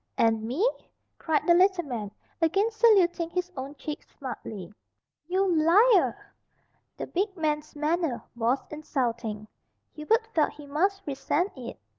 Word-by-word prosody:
"And 225 -1 +3
me!" 260 - +1 0.5
cried 315 -2 0
the 345 - +6
little 370 0 +4
man, 235 -8 -4 0.3
again 390 +7 +2
saluting 390 -7 +4
his 360 +1 -3
own 270 +2 -6
cheek 300 0 -6
smartly. 215 -8 -8 0.5
"You 370 0 +1
liar!" 370 +7 +5 0.8
The - - -4
big 390 +1 -2
man's 300 -2 -2
manner 305 -3 -1
was 240 +3 0
insulting. 235 -8 -3 0.5
Hubert 445 +10 +1
felt 310 -2 +2
he 295 - -12
must 385 +8 0
resent 300 +6 -1
it. 250 -3 -8
310 Hz, 130 wpm, -27 LUFS, 260-370 Hz, 0.8 s, the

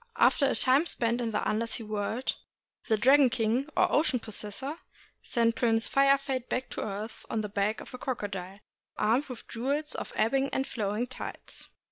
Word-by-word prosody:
After 280 - +4
a - - +1
time 270 +6 +4
spent 235 -3 0
in 235 - -1
the 210 - -1
under 225 +2 0
sea 230 - -2
world, 215 +4 -2 0.5
the 220 - +3
Dragon 265 +4 +6
King, 235 +5 0
or - - +4
Ocean 290 -4 +2
Possessor, 220 +7 -5 0.4
sent 230 -1 +1
Prince 225 -2 +2
Fire 275 0 +5
Fade 265 -2 -4
back 255 0 -2
to - - -4
earth 210 +2 -5
on 225 - 0
the 210 - -4
back 205 +2 0
of - - -12
a 250 - -7
crocodile, 200 -7 -4 0.4
armed 240 +7 +2
with 250 -3 -8
the - - -17
jewels 280 +6 -1
of - - -5
the - - -2
ebbing 270 +5 +2
and 265 - 0
flow 210 -5 -2
ing 235 +3 0
tides. 255 - -7
235 Hz, 195 wpm, -29 LUFS, 215-270 Hz, 0.5 s, Dragon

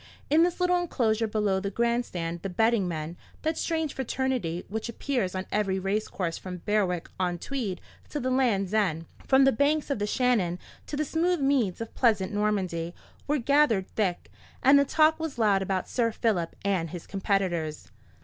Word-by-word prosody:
In 310 +2 +6
the 350 +1 +4
little 360 0 +3
enclosure 225 -9 0
below 210 -3 +1
the 200 +1 -3
grand 235 +3 +1
stand 170 -1 -4
the 195 - -4
betting 220 +1 +2
men—that 170 - -5
strange 320 -3 -1
fraternity 255 -9 -2
which 220 +3 -4
appears 235 -5 -2
on 185 0 -3
every 195 -2 +1
racecourse 195 -3 -2
from 180 -2 -8
Berwick 190 -5 +1
on 180 -1 0
Tweed 220 -3 -3 0.3
to 295 - -3
the 255 -1 -1
Land's 220 -7 +1
End, 175 -7 +1 0.2
from 270 0 +6
the 270 - +6
banks 290 +4 +1
of 275 - -1
the 205 - -1
Shannon 215 -8 +1 0.3
to - - -4
the 305 - 0
smooth 340 +4 +1
meads 265 -9 +1
of 225 - -6
pleasant 215 -5 +2
Normandy—were 200 - -2
gathered 255 -7 +3
thick, 190 -5 -2 0.3
and 275 +2 +7
the 280 - +3
talk 315 +3 +3
was 320 -5 -4
loud 205 -4 +3
about 190 -1 -1
Sir 230 -2 +1
Philip 210 -7 -1
and 185 -5 0
his 175 0 -7
competitors. 190 -6 -1
215 Hz, 170 wpm, -27 LUFS, 185-265 Hz, 0.3 s, and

